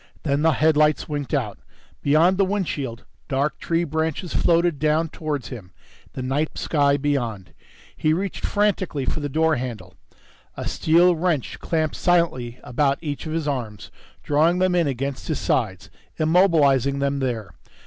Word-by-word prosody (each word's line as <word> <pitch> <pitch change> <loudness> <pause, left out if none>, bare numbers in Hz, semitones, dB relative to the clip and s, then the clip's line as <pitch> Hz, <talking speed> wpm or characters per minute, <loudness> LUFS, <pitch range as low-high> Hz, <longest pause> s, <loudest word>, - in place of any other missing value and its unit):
Then 140 -1 0
the 160 0 +4
headlights 155 +1 +3
winked 145 -5 -4
out. - - -2 0.4
Beyond 165 +6 +3
the - - +5
windshield, 155 - -3 0.2
dark 140 +2 -1
tree 165 0 0
branches 160 +2 -2
floated 170 -3 +2
down 155 +2 +1
towards 150 -5 -4
him, 100 -9 -9 0.4
the 130 - -5
night 140 +4 -1
sky 140 -2 +2
beyond. 120 -9 -2 0.4
He 155 - +1
reached 190 +5 -2
frantically 195 -9 0
for - - -2
the 145 -1 -3
door 160 +1 +2
handle. 120 -3 -6 0.6
A - - -4
steel 175 +2 +3
wrench 165 -5 -1
clamped 160 -2 -1
silently 145 -9 +1
about 140 +2 +1
each 145 0 -4
of 155 - -4
his 160 -2 -2
arms, 120 -7 -4 0.3
drawing 160 +4 +2
them 185 0 +2
in 175 -3 +2
against 135 0 -3
his 155 - -1
sides, 95 -7 -1 0.3
immobilizing 155 -6 +3
them 140 0 0
there. 115 -8 -3
150 Hz, 150 wpm, -23 LUFS, 135-165 Hz, 0.6 s, the